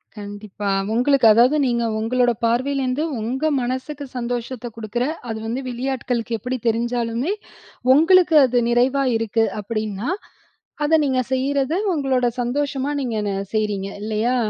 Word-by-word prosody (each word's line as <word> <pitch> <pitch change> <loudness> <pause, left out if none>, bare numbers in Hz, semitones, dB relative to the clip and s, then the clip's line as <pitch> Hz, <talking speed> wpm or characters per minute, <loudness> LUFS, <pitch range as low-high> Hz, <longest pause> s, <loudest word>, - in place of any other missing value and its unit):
கண்டிப்பா. 205 -1 -6 0.2
உங்களுக்கு 250 0 +4
அதாவது, 245 +7 +5
நீங்க 235 -2 +1 0.2
உங்களோட 245 +2 +2
பார்வையிலிருந்து 260 +3 0 0.2
உங்க 265 +8 -1
மனசுக்கு 260 +4 -4
சந்தோஷத்தை 245 0 -4
குடுக்குற, 230 +3 -2 0.2
அது 220 - -3
வந்து 240 +4 -2
வெளியாட்களுக்கு 245 -2 -2
எப்படி 255 +4 -3
தெரிஞ்சாலுமே, 235 - 0 0.6
உங்களுக்கு 330 +2 +5
அது 245 -1 +1
நிறைவா 255 +3 +2
இருக்கு 225 0 +1 0.2
அப்படின்னா, 215 - -3 0.8
அத 320 +2 +4
நீங்க 255 -1 +1
செய்றது, 280 +5 0 0.2
உங்களோட 265 -4 +1
சந்தோஷமா 275 +3 -1
நீங்க 230 -4 -2 0.4
செய்றீங்க 205 -2 -1
இல்லையா? 220 +4 0
245 Hz, 115 wpm, -21 LUFS, 225-270 Hz, 0.8 s, அதாவது